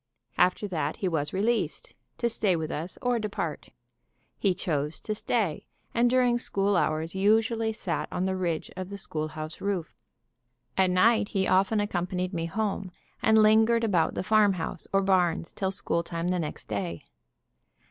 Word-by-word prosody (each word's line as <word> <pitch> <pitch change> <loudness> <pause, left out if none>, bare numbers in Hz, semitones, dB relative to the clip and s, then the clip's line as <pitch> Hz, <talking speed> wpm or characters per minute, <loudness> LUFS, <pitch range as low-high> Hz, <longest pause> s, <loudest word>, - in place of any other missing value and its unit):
After 185 +3 +3
that 155 -5 -2
he 190 - -2
was 155 -4 -1
released, 230 - -1 0.2
to 235 - +1
stay 215 -5 +1
with 160 -1 -3
us 165 +5 -3
or 245 -1 +2
depart. 210 -2 -4 0.7
He 195 -3 +2
chose 150 -4 -2
to 215 - -2
stay, 210 -6 -1 0.3
and 240 +1 +3
during 245 -1 +3
school 200 -3 0
hours 160 -1 0
usually 220 +3 +2
sat 185 -6 -3
on 180 - -1
the 190 0 0
ridge 170 -4 -2
of 185 0 -5
the 200 - -6
schoolhouse 155 -3 -5
roof. 195 -5 -2 0.8
At 190 -1 +3
night 205 +4 +4
he 190 -1 0
often 195 +3 +3
accompanied 180 -2 -2
me 165 -1 -2
home, 200 +1 -2 0.3
and 220 0 +5
lingered 220 +2 +5
about 185 -7 +2
the - - -2
farmhouse 195 -5 +1
or 195 0 +3
barns 180 -4 +1
till 190 - -1
school 180 -3 0
time 170 +1 -3
the 180 0 +1
next 155 -3 -5
day. 90 -6 -4
190 Hz, 160 wpm, -27 LUFS, 170-215 Hz, 0.8 s, and